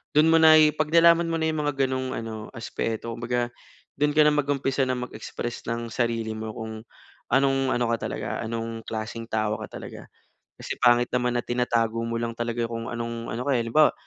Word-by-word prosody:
do'n 155 +2 +6
mo 165 - +6
na 160 -1 +8 0.2
pag 155 +1 -1
nalaman 170 0 +6
mo 165 -1 -1
na 160 - +2
yung 155 -1 -1
mga 145 - 0
ganong 130 0 -2
ano 110 -1 -5
aspeto 115 -1 -4
kumbaga 120 +1 -1 0.5
do'n 145 +1 +2
kana 150 0 +6
mag-umpisa 140 -2 +1
na 130 - 0
mag 125 0 -4
express 120 +2 -6
ng 115 0 -3
sarili 115 -2 -1
mo 110 0 -5
kung 110 0 -7 0.5
anong 135 -1 +3
ano 120 0 +1
ka 115 -2 -1
talaga, - - -3
anong 115 0 -4
klaseng 110 +1 -5
tao 110 -1 -1
ka - - -6
talaga. - - -8 0.5
Kasi - - -6
pangit 120 0 +4
naman 125 -1 +1
na 120 - -2
tinatago 115 -2 0
mo 115 0 -2
lang 115 0 -2
talaga 120 0 -2
kung 115 0 -5
anong 115 -1 -4
ano 115 - -3
ka, 140 - +2
eh. 120 - +2
Halimbawa 130 +7 +4
120 Hz, 195 wpm, -25 LUFS, 115-135 Hz, 0.5 s, na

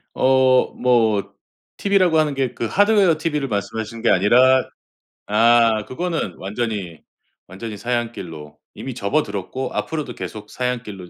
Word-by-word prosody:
어 130 -1 +3
뭐 115 -5 +1 0.4
TV라고 185 -5 +3
하는 150 -2 +1
게 130 -3 -1
그 - - -4
하드웨어 200 - +3
TV를 150 -4 -2
말씀하시는 110 +1 -4
게 - - +3
아니라 125 +7 +4 0.6
아 115 0 +4
그거는 165 - -3
완전히 100 -5 -4 0.5
완전히 105 +3 -8
사양길로 90 -12 -5 0.2
이미 130 - -7
접어들었고 105 +1 -2
앞으로도 150 -6 -4
계속 105 -1 -8
사양길로 115 -8 -4
120 Hz, 310 characters per minute, -21 LUFS, 105-135 Hz, 0.6 s, 아니라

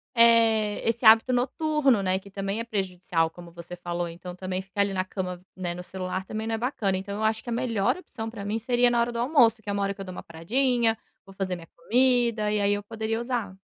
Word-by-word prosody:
eh, 225 -2 +4
esse 235 +1 0
hábito 225 +3 +7
noturno, 270 -1 +2
né, 185 -1 +1
que 200 +1 -15
também 195 +2 -3
é - - -2
prejudicial, 180 -6 -1
como 175 +1 -12
você 170 +1 -9
falou. 175 0 -3
Então 175 +1 -8
também 185 0 -3
ficar 195 +1 -3
ali 200 -1 +1
na 185 -1 -1
cama, 180 -2 -5
né, 180 -2 -3
no 180 - -7
celular 185 +1 -4
também 220 +2 -4
não 225 - 0
é - - -3
bacana. 220 -5 -1
Então 200 +2 -5
eu 215 - -3
acho 220 0 +1
que - - -7
a - - -1
melhor 230 - 0
opção, 225 -11 -7
pra 220 -3 -8
mim, 210 +2 -1
seria 245 +1 +2
na 240 -1 +2
hora 235 +1 +1
do 235 - -4
almoço, 240 -4 +4
que 205 - -8
é - - 0
uma 200 0 0
hora 200 0 0
que 195 - -10
eu - - -5
dou 185 - -7
uma - - -8
paradinha, 230 +7 +1 0.3
vou 195 - -14
fazer 190 -1 -2
minha 170 -1 -11
comida, 240 -3 +2
e 210 - +1
aí, 200 0 +3
eu 205 0 -3
poderia 220 +1 -3
usar. 235 -6 -3
210 Hz, 250 wpm, -26 LUFS, 185-235 Hz, 0.3 s, hábito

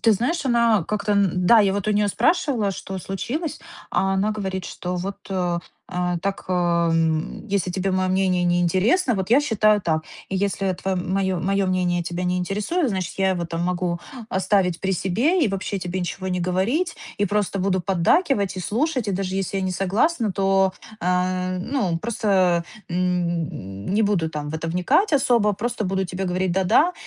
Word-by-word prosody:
Ты 225 - +5
знаешь, 250 - 0
она 235 -6 +3
как-то, 210 0 -1
н-да, 195 +2 +4
я 195 -2 +3
вот 200 0 -2
у - - +3
нее 205 0 +2
спрашивала, 260 - +1
что 190 0 -6
случилось. 245 - -4 0.3
А 195 0 +1
она 200 +3 +1
говорит, 190 -3 -3
что 180 0 -4
вот, 195 +3 -4
э, 180 -3 0 0.4
а, 180 -1 0
так, 195 0 -2
э, - - 0
м: 170 0 +1
"Если 195 -2 0
тебе 190 +1 -1
мое 185 0 +1
мнение 185 -1 +2
не 175 0 +2
интересно, 220 - +2
вот 190 -1 -2
я 255 +5 +5
считаю 215 -5 +3
так. 155 -2 0 0.3
И 190 - -1
если 195 -1 0
твоё, 190 +1 -2
м, 180 +1 -3
мое 190 -1 +1
мое 195 +2 +1
мнение 180 -1 +1
тебя 175 +1 -3
не 180 0 0
интересует, 210 - -1
значит, 190 -3 -3
я 190 0 +3
его 175 -2 -1
там 165 0 -3
могу 175 -1 -1 0.3
оставить 185 -2 +1
при 190 0 0
себе 245 - +1
и 225 - +2
вообще 195 0 -3
тебе 180 +1 -3
ничего 185 +1 -4
не 180 -1 -1
говорить. 215 - 0 0.2
И 205 - +2
просто 205 0 0
буду 185 0 +1
поддакивать 200 - +2
и - - -3
слушать, 250 - -1
и - - 0
даже 190 0 -2
если 195 0 -1
я - - -2
не 185 -1 -1
согласна, 215 - +1
то, 195 -1 +2 0.3
э, 185 0 0
ну 190 -6 -1
просто, 190 -5 +1 0.2
м, 170 - -2
не 210 - +2
буду 185 -6 +1
там 150 -1 -5
в 155 - -5
это 165 +1 -3
вникать 180 - +2
особо. 235 -6 +3
Просто 225 +2 -3
буду 190 0 -1
тебе 185 +2 -4
говорить 180 0 0
'да-да'. 220 - +3
190 Hz, 190 wpm, -23 LUFS, 180-210 Hz, 0.4 s, Ты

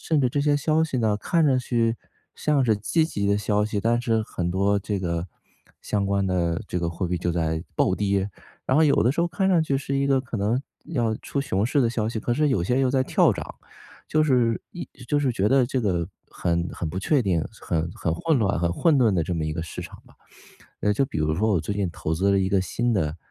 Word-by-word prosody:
甚 160 - 0
至 125 - +2
这 145 - 0
些 145 0 +2
消 155 +2 +1
息 155 -5 -1
呢， 110 -3 +1
看 165 +9 +1
上 135 -4 +3
去 115 -2 0 0.4
像 145 -3 +1
是 110 -3 +3
积 135 +10 +1
极 100 -11 -2
的 100 0 +3
消 105 0 +1
息， 105 0 -2
但 115 +3 +1
是 115 -2 +1
很 90 -4 -3
多 100 +2 +2
这 100 0 -3
个 85 -2 -2 0.6
相 100 -2 -1
关 100 0 +1
的 90 0 0
这 90 - -3
个 85 - -1
货 85 +2 -3
币 90 0 -2
就 85 - -1
在 80 -1 -1
暴 95 - +2
跌， 100 0 0 0.3
然 130 - +1
后 160 - +5
有 150 - +4
的 120 - +3
时 160 - -1
候 170 - +1
看 180 +2 -1
上 175 -4 +4
去 140 -3 0
是 140 0 -3
一 140 0 +1
个 135 -1 +3
可 130 -3 -5
能 110 +6 +1 0.3
要 120 -9 0
出 140 - -3
熊 100 -6 0
市 140 +1 +2
的 115 - +2
消 110 -2 -1
息， 115 -1 -3
可 120 - -1
是 150 +4 +2
有 100 -11 +1
些 125 +7 +1
又 130 -1 +2
在 130 0 +2
跳 - - +3
涨。 - - -7 0.5
就 155 - +2
是 125 -6 +2
一 175 - -7 0.2
就 145 - +2
是 135 -4 +1
觉 100 -1 +1
得 130 -1 +4
这 130 0 -1
个 90 -6 -1 0.2
很 85 0 -1
很 85 - -4
不 85 - -7
确 135 +10 +2
定， 90 -8 0 0.2
很 85 0 -2
很 80 -2 -2
混 155 - +1
乱、 100 -4 +1
很 85 +1 0
混 160 - +3
沌 120 -5 +4
的 85 -4 +1
这 90 - -2
么 80 -2 -2
一 80 - -2
个 80 - -3
市 - - -7
场 - - -11
吧。 - - -20 0.7
呃， 105 - +2
就 105 - +1
比 - - -6
如 75 0 +1
说 110 +6 +1
我 95 - +3
最 80 +6 -3
近 100 -2 -1
投 80 -1 -4
资 95 +5 +2
了 100 - +3
一 95 - +1
个 100 -2 +3
新 120 +6 -1
的 80 -7 0
105 Hz, 275 characters per minute, -24 LUFS, 90-135 Hz, 0.7 s, 后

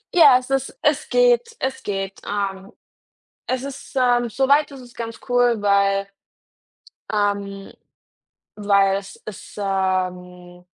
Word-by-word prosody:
Ja, 285 -7 +8
es 255 +1 -7
ist 270 - -1
es - - +1
geht, 485 -2 +3
es 265 0 -3
geht, 195 -1 -4
ähm. 195 -1 -3 0.8
Es 255 0 -1
ist, 275 0 -9
ähm 245 -2 +3
so 265 +4 0
weit 290 +1 +4
ist 270 - -10
es 245 -1 -15
ganz 230 -1 -6
cool, 245 -2 +3
weil, 200 0 +2 1.0
ähm 200 -1 -2 0.9
weil 200 -2 +3
es 195 - -11
es, 215 -3 -10
ähm 180 -2 -3
205 Hz, 130 wpm, -21 LUFS, 195-260 Hz, 1.0 s, Ja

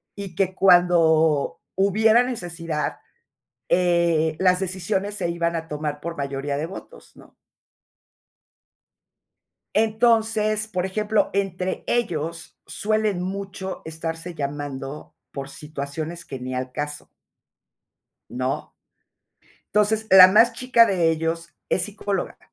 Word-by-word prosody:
y 195 -4 -7
que 190 +1 0
cuando 165 -5 +4 0.2
hubiera 215 +4 +4
necesidad, 170 -10 -4 0.7
eh, 170 -3 +2
las 185 -1 +3
decisiones 190 +2 -2
se 180 -4 -2
iban 170 0 -1
a 165 -1 -4
tomar 150 0 -4
por 170 +2 -5
mayoría 140 0 -3
de 150 - -2
votos, 330 - -11
¿no? - - -18 2.4
Entonces, 220 -1 +2
por 185 -4 -2
ejemplo, 210 +2 0
entre 190 -2 -2
ellos 165 -8 -2
suelen 215 -3 -1
mucho 190 0 -5
estarse 165 +2 -5
llamando, 145 -1 -6 0.2
por 140 -1 -7
situaciones 155 +3 -6
que 135 -2 -8
ni 130 +1 -5
al 125 0 -4
caso. 145 +2 -5 1.2
¿No? 130 +1 -3 1.0
Entonces, 215 +1 +2
la 185 -1 +10
más 225 +5 +5
chica 245 -1 +4
de 175 -5 +2
ellos 165 +1 -3
es 185 - +1
psicóloga. 205 -1 -4
175 Hz, 110 wpm, -23 LUFS, 155-200 Hz, 2.4 s, la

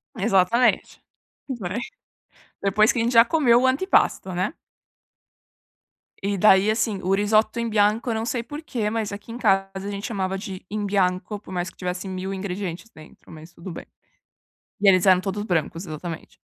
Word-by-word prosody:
Exatamente. 215 +4 +2 0.5
Bem. 225 -4 -3 0.8
Depois 210 +3 +3
que - - -3
a - - +2
gente 235 +2 0
já 230 0 +8
comeu 245 -3 +3
o - - +4
antepasto, 260 - +2
né. 185 +7 -1 1.7
E 200 0 -1
daí 200 +1 +5
assim, 220 -2 -1
o 190 - +1
risoto 215 +3 +2
in 235 - -1
bianco 215 +3 +2
eu 225 - 0
não 220 - -2
sei 240 0 -2
porquê, 245 -4 -4
mas 220 -1 -2
aqui 205 +3 -8
em 240 - -6
casa 195 -4 +2
a 190 - -3
gente 200 +1 -5
chamava 195 -3 -2
de 190 -2 -8
in 210 0 -3
bianco 190 0 0
de 205 - -8
por 190 - -11
mais 175 0 -2
que - - -23
tivesse 180 +1 -4
mil 190 +1 -4
ingredientes 190 +1 -5
dentro, 155 +1 -16
mas 160 +2 -12
tudo 175 +2 -9
bem. 165 - -8 0.9
E 200 - +2
eles 185 -1 +5
eram 185 -2 +6
todos 195 +2 -3
brancos, 170 -2 -2
exatamente. 160 +1 -7
200 Hz, 180 wpm, -23 LUFS, 185-225 Hz, 1.7 s, já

